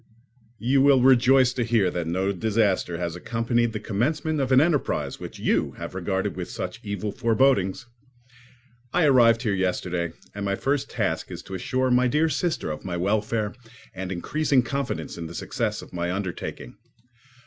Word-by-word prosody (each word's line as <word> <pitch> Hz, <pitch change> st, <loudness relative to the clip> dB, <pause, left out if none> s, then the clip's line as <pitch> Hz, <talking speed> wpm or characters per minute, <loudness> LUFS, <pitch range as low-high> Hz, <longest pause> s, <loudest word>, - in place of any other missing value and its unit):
You 130 Hz, +4 st, +2 dB
will 135 Hz, -2 st, +5 dB
rejoice 130 Hz, 0 st, +5 dB
to 125 Hz, -, -1 dB
hear 110 Hz, -6 st, +2 dB
that 85 Hz, -2 st, -3 dB
no 95 Hz, +4 st, 0 dB
disaster 100 Hz, -3 st, 0 dB
has 85 Hz, -1 st, -3 dB
accompanied 115 Hz, +4 st, 0 dB
the 110 Hz, -, -4 dB
commencement 145 Hz, +9 st, -1 dB
of 135 Hz, -1 st, -1 dB
an 130 Hz, -, +7 dB
enterprise 150 Hz, -1 st, 0 dB
which -, -, -8 dB
you -, -, 0 dB
have -, -, -7 dB
regarded -, -, -2 dB
with -, -, -5 dB
such -, -, -5 dB
evil 100 Hz, +1 st, -3 dB
forebodings. 115 Hz, -1 st, +2 dB, 1.1 s
I 180 Hz, -, +3 dB
arrived 120 Hz, -4 st, +5 dB
here 110 Hz, -4 st, +1 dB
yesterday, 90 Hz, -2 st, -1 dB, 0.2 s
and 100 Hz, -, -5 dB
my 100 Hz, 0 st, 0 dB
first 140 Hz, +4 st, -1 dB
task -, -, -2 dB
is -, -, -7 dB
to 95 Hz, -, -10 dB
assure 130 Hz, +7 st, 0 dB
my 125 Hz, +1 st, +4 dB
dear 150 Hz, +6 st, +2 dB
sister 160 Hz, -, -1 dB
of 75 Hz, -, -6 dB
my 90 Hz, -2 st, -3 dB
welfare 105 Hz, +3 st, 0 dB, 0.4 s
and 95 Hz, 0 st, -5 dB
increasing 135 Hz, -, +1 dB
confidence 120 Hz, -, -3 dB
in 85 Hz, -, -5 dB
the 85 Hz, -, -9 dB
success 110 Hz, -4 st, -2 dB
of -, -, -15 dB
my 85 Hz, 0 st, -2 dB
undertaking. 95 Hz, -1 st, -5 dB
115 Hz, 170 wpm, -25 LUFS, 95-130 Hz, 1.1 s, an